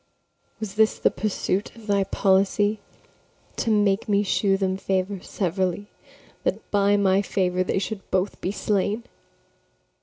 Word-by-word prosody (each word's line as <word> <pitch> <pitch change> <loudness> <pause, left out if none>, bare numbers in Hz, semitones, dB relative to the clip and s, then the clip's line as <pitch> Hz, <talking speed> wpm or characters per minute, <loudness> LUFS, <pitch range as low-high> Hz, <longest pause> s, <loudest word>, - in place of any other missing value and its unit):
Was 215 -3 -5
this 220 +1 +3
the - - +2
pursuit 205 -1 -2
of 230 -2 -13
thy 200 -2 +2
policy, 200 +2 +2 0.8
To 230 - -1
make 205 -1 +2
me 205 0 +3
shew 195 0 +2
them 190 -1 0
favour 190 0 -1
severally, 190 +2 -2 0.5
That - - -2
by 205 0 +3
my 195 -1 +3
favour 185 -2 0
they 185 - -1
should 195 +1 -4
both 190 +2 -1
be 185 - -1
slain? 205 +2 -1
200 Hz, 140 wpm, -24 LUFS, 190-205 Hz, 0.8 s, this